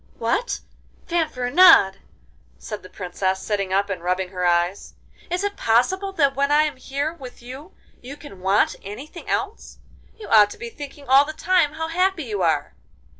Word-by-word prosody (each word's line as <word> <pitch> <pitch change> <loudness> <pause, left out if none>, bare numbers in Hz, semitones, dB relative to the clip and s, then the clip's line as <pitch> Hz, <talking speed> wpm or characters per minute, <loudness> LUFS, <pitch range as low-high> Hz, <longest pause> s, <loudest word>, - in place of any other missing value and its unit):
'What! 400 - -1 0.4
Fanfaronade,' 310 - +4 0.6
said 210 -2 -7
the 185 - -13
Princess, 185 +1 -3
sitting 200 -3 -2
up 200 +1 +1
and 195 -4 -5
rubbing 180 +1 -1
her 180 -1 -2
eyes, 175 +3 0 0.3
'is 355 +3 -2
it 405 0 -2
possible 375 - +1
that 280 -6 +2
when 280 +1 0
I 300 +1 +5
am 300 -3 -3
here 280 +4 -3
with 255 -7 -12
you 270 +9 -10 0.3
you 270 +4 -9
can 285 -11 -13
want 190 +2 +2
anything 270 - -9
else? 415 +3 -3 0.4
You 435 - -10
ought 210 -2 +6
to - - -10
be 235 0 -7
thinking 285 0 -10
all 270 +2 +6
the 310 +2 -6
time 335 -2 +1
how 320 0 -4
happy 365 +1 0
you 210 -6 -4
are. 160 - 0
260 Hz, 175 wpm, -22 LUFS, 195-320 Hz, 0.6 s, ought